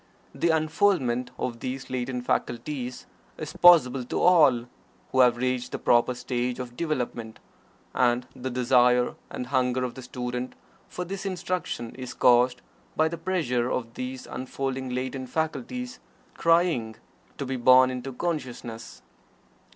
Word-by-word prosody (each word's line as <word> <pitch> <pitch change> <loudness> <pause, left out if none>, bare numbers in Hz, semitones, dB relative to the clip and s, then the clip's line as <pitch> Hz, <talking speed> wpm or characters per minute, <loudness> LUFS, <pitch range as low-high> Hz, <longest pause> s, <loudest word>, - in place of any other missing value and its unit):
The 170 - 0
unfoldment 155 - +1
of 120 -2 -3
these 130 +2 -5
latent 125 -1 -3
faculties 125 +1 -2 0.3
is - - -6
possible 135 -8 +6
to - - -2
all 150 -10 +5 0.5
who 130 - +1
have 125 -2 +6
reached 125 0 -2
the - - -1
proper 120 +1 +3
stage 125 0 -2
of 125 -1 -7
development, 125 -7 -3 0.5
and 125 0 +2
the 130 +1 -4
desire 125 0 +3 0.2
and 125 - -5
hunger 130 -1 +1
of 125 -2 -3
the 130 - -9
student 125 0 -5 0.3
for 180 - -5
this 195 +3 -5
instruction 185 - -3
is 130 -1 -7
caused 125 0 +4 0.3
by 160 0 +3
the 170 - -5
pressure 125 -10 0
of 115 -3 -3
these 130 +1 -6
unfolding 130 0 -4
latent 130 +1 -4
faculties, 245 - -3 0.3
crying 165 -10 +2 0.4
to 140 - -3
be 135 0 -3
born 130 +1 +6
into 130 +1 -5
consciousness. 125 -6 -5
130 Hz, 135 wpm, -26 LUFS, 125-150 Hz, 0.5 s, possible